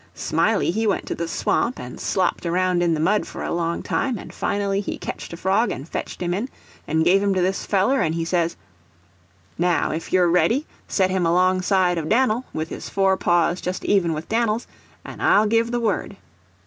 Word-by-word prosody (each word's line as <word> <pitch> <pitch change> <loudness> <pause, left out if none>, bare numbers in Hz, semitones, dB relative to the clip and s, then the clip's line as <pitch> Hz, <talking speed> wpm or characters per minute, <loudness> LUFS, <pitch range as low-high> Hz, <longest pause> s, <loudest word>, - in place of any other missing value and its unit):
Smiley - - +1
he 220 +4 0
went 200 - 0
to - - -3
the 170 - -4
swamp 235 +8 0
and 125 0 -8
slopped 185 -1 0
around 180 +1 +1
in 170 -2 +2
the - - -3
mud 200 +7 +1
for - - -7
a - - -2
long 170 0 -1
time, 255 -4 -1
and - - -10
finally 200 -1 -1
he - - -4
ketched - - -6
a 170 - -7
frog, 195 +6 +1
and 140 - -5
fetched - - -5
him 175 0 -1
in, 215 +8 -2 0.4
and 160 +1 +1
give 190 +3 +4
him 200 -1 +1
to 185 - +1
this 190 +1 -1
feller, 210 +7 +2
and 165 -1 -1
says: 170 -1 0 1.0
"Now, 175 0 +1
if 160 +2 -5
you're 180 -1 +4
ready, 180 - +2 0.2
set 190 -2 +1
him 185 -2 +1
alongside 185 0 +2
of 155 - -4
Dan'l, 250 0 +2
with 155 +1 -4
his - - -7
forepaws 185 -3 +2
just 180 +1 -4
even 180 -5 +2
with 155 +1 -5
Dan'l's, 225 0 0 0.4
and - - -9
I'll 210 - +4
give 230 +2 +2
the 240 0 -1
word." 225 -3 -2
185 Hz, 200 wpm, -22 LUFS, 170-205 Hz, 1.0 s, give